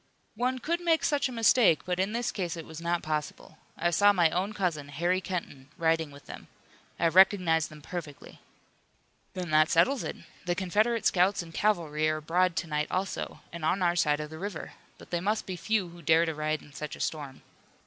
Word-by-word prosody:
"One 255 Hz, +2 st, 0 dB
could 340 Hz, +7 st, -2 dB
make 330 Hz, -2 st, +2 dB
such 285 Hz, -3 st, +1 dB
a -, -, -7 dB
mistake, 230 Hz, -, +4 dB
but 180 Hz, 0 st, -2 dB
in 190 Hz, +2 st, +1 dB
this 235 Hz, +1 st, -1 dB
case 175 Hz, -4 st, -3 dB
it 165 Hz, -, -7 dB
was 160 Hz, 0 st, -9 dB
not 170 Hz, 0 st, -1 dB
possible. 155 Hz, 0 st, -4 dB, 0.2 s
I 175 Hz, +1 st, +1 dB
saw 205 Hz, +4 st, +5 dB
my 175 Hz, -5 st, +3 dB
own 190 Hz, +4 st, -1 dB
cousin, 175 Hz, -8 st, -2 dB
Harry 175 Hz, +6 st, 0 dB
Kenton, 165 Hz, -7 st, -5 dB
riding 165 Hz, -2 st, +1 dB
with 140 Hz, 0 st, -14 dB
them. -, -, -10 dB, 0.5 s
I 170 Hz, -, +3 dB
recognized 180 Hz, -3 st, +4 dB
them 150 Hz, -2 st, -13 dB
perfectly." 155 Hz, -5 st, -8 dB, 1.0 s
"Then 180 Hz, -3 st, -4 dB
that 155 Hz, +1 st, +5 dB
settles 205 Hz, +11 st, +3 dB
it. -, -, -4 dB, 0.3 s
The 175 Hz, 0 st, 0 dB
Confederate 215 Hz, +6 st, +1 dB
scouts 185 Hz, +1 st, +3 dB
and 165 Hz, -1 st, -13 dB
cavalry 160 Hz, -7 st, +1 dB
are 155 Hz, -, 0 dB
abroad 170 Hz, +3 st, +1 dB
to -, -, -2 dB
night 150 Hz, -1 st, -1 dB
also, 190 Hz, +1 st, -3 dB
and 170 Hz, -1 st, -7 dB
on 185 Hz, +4 st, +1 dB
our 175 Hz, 0 st, +2 dB
side 150 Hz, -3 st, +2 dB
of 150 Hz, 0 st, -6 dB
the 160 Hz, -, -8 dB
river. 195 Hz, -3 st, -6 dB, 0.2 s
But -, -, -15 dB
they 175 Hz, -1 st, -1 dB
must 210 Hz, +3 st, 0 dB
be 185 Hz, -, -4 dB
few 205 Hz, 0 st, -1 dB
who 170 Hz, 0 st, -13 dB
dare 160 Hz, +2 st, +4 dB
to 160 Hz, -, -2 dB
ride 155 Hz, 0 st, -2 dB
in 145 Hz, -, -17 dB
such 150 Hz, 0 st, -6 dB
a -, -, -14 dB
storm." 145 Hz, -4 st, -4 dB
175 Hz, 210 wpm, -29 LUFS, 155-195 Hz, 1.0 s, saw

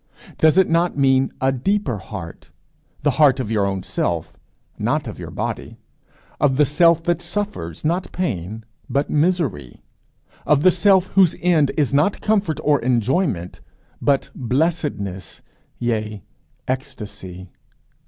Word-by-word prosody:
Does 160 Hz, +2 st, +4 dB
it 190 Hz, -, +5 dB
not 170 Hz, -1 st, +1 dB
mean 135 Hz, -1 st, +3 dB
a 135 Hz, 0 st, +2 dB
deeper 135 Hz, -, -1 dB
heart, 95 Hz, -3 st, -9 dB, 0.5 s
the 145 Hz, -, +3 dB
heart 135 Hz, -3 st, +5 dB
of 115 Hz, -4 st, -3 dB
your 105 Hz, -3 st, +1 dB
own 95 Hz, -1 st, -3 dB
self, -, -, -2 dB, 0.4 s
not -, -, 0 dB
of -, -, -7 dB
your -, -, -7 dB
body? -, -, -5 dB, 0.6 s
of 135 Hz, -2 st, +2 dB
the 150 Hz, -, +5 dB
self 165 Hz, +3 st, +4 dB
that 175 Hz, 0 st, 0 dB
suffers, 170 Hz, -, -4 dB
not 175 Hz, +4 st, -1 dB
pain, 110 Hz, -, -3 dB, 0.3 s
but 140 Hz, +1 st, 0 dB
misery? 150 Hz, -, -1 dB, 0.6 s
of 150 Hz, -1 st, +2 dB
the 185 Hz, -, +7 dB
self 190 Hz, +1 st, +3 dB
whose 190 Hz, -4 st, +4 dB
end 165 Hz, -5 st, +3 dB
is 145 Hz, -3 st, +1 dB
not 150 Hz, +8 st, +2 dB
comfort, 200 Hz, -8 st, 0 dB
or 150 Hz, -1 st, +3 dB
enjoyment, 120 Hz, -, 0 dB, 0.4 s
but 140 Hz, -1 st, +1 dB
blessedness, 125 Hz, -, -2 dB, 0.3 s
yea, 110 Hz, -5 st, -2 dB, 0.4 s
ecstasy? 95 Hz, -8 st, -6 dB
140 Hz, 135 wpm, -21 LUFS, 110-170 Hz, 0.6 s, the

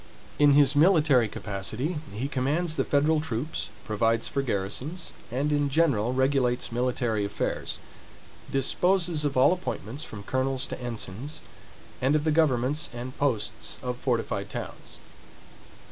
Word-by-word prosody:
In 145 Hz, -1 st, +6 dB
his 145 Hz, 0 st, +5 dB
military 150 Hz, -, +5 dB
capacity 110 Hz, -, -3 dB
he 110 Hz, +7 st, -3 dB
commands 145 Hz, +5 st, 0 dB
the -, -, +1 dB
federal 150 Hz, +2 st, +2 dB
troops, 145 Hz, -1 st, -3 dB, 0.2 s
provides 115 Hz, +2 st, +1 dB
for 140 Hz, -, -1 dB
garrisons, 130 Hz, -, -2 dB, 0.2 s
and 135 Hz, +5 st, -1 dB
in 145 Hz, -1 st, +2 dB
general 135 Hz, -7 st, +2 dB
regulates 130 Hz, -2 st, +1 dB
military 120 Hz, -3 st, 0 dB
affairs; 100 Hz, +1 st, -2 dB, 0.7 s
disposes 170 Hz, +3 st, +2 dB
of 140 Hz, -2 st, -1 dB
all 135 Hz, +7 st, +6 dB
appointments, 145 Hz, -, -5 dB
from 105 Hz, -9 st, -8 dB
colonels 130 Hz, +3 st, 0 dB
to 125 Hz, -, -6 dB
ensigns, 120 Hz, +4 st, -4 dB, 0.6 s
and 135 Hz, +3 st, +3 dB
of 150 Hz, -, +1 dB
the 155 Hz, -, +2 dB
governments 150 Hz, -2 st, +2 dB
and 125 Hz, +2 st, -6 dB
posts 120 Hz, -8 st, -1 dB
of 125 Hz, -1 st, -2 dB
fortified 115 Hz, -5 st, -1 dB
towns. -, -, -7 dB
130 Hz, 130 wpm, -27 LUFS, 120-150 Hz, 0.7 s, In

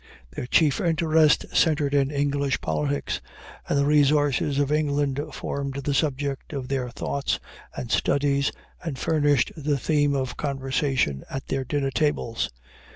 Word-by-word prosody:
Their 125 Hz, -, -5 dB
chief 150 Hz, +3 st, +3 dB
interest 160 Hz, -3 st, +3 dB
centered 150 Hz, -3 st, +3 dB
in 140 Hz, -1 st, +3 dB
English 140 Hz, -1 st, 0 dB
politics, 75 Hz, -3 st, -2 dB, 0.5 s
and 145 Hz, -, +2 dB
the 140 Hz, -, +3 dB
resources 145 Hz, -1 st, +3 dB
of 145 Hz, 0 st, +1 dB
England 145 Hz, -2 st, +1 dB
formed 140 Hz, -1 st, -4 dB
the 140 Hz, +1 st, -2 dB
subject 140 Hz, -1 st, -1 dB
of 135 Hz, -3 st, -4 dB
their 130 Hz, -2 st, -1 dB
thoughts 140 Hz, +3 st, -2 dB, 0.4 s
and 120 Hz, -, -5 dB
studies, 140 Hz, +1 st, +2 dB, 0.3 s
and 160 Hz, -6 st, -4 dB
furnished 145 Hz, -4 st, +2 dB
the 150 Hz, -2 st, 0 dB
theme 145 Hz, 0 st, +1 dB
of 130 Hz, -2 st, -2 dB
conversation 135 Hz, -, -1 dB
at 135 Hz, 0 st, -5 dB
their 135 Hz, -1 st, 0 dB
dinner 135 Hz, +1 st, -1 dB
tables. 125 Hz, -7 st, 0 dB
140 Hz, 140 wpm, -25 LUFS, 135-145 Hz, 0.5 s, chief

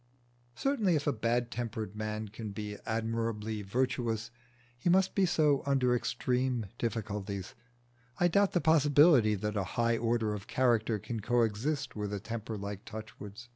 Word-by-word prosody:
Certainly 225 Hz, -, +1 dB
if 145 Hz, -, -1 dB
a 145 Hz, -, +2 dB
bad 120 Hz, +2 st, 0 dB
tempered 110 Hz, -4 st, -4 dB
man 110 Hz, 0 st, -3 dB
can 110 Hz, +1 st, -7 dB
be 105 Hz, 0 st, -5 dB
admirably 110 Hz, -1 st, -2 dB
virtuous, 115 Hz, +1 st, -1 dB, 0.4 s
he 120 Hz, +8 st, -1 dB
must 190 Hz, +2 st, +4 dB
be 195 Hz, -2 st, +3 dB
so 150 Hz, -4 st, +3 dB
under 130 Hz, -3 st, +2 dB
extreme 125 Hz, -1 st, 0 dB
difficulties. 105 Hz, -4 st, -3 dB, 0.7 s
I 175 Hz, -, +5 dB
doubt 200 Hz, +3 st, +3 dB
the 175 Hz, -, +2 dB
possibility 145 Hz, -6 st, +5 dB
that 105 Hz, +2 st, -3 dB
a 100 Hz, -, +1 dB
high 115 Hz, -1 st, +2 dB
order 115 Hz, -2 st, +1 dB
of 100 Hz, -2 st, -7 dB
character 115 Hz, -3 st, +2 dB
can 115 Hz, +3 st, -5 dB
coexist 120 Hz, +5 st, 0 dB
with 105 Hz, -1 st, -3 dB
a 100 Hz, -, -2 dB
temper 110 Hz, +1 st, -5 dB
like 100 Hz, 0 st, -6 dB
Touchwood's. 110 Hz, +1 st, -9 dB
115 Hz, 150 wpm, -31 LUFS, 105-130 Hz, 0.7 s, I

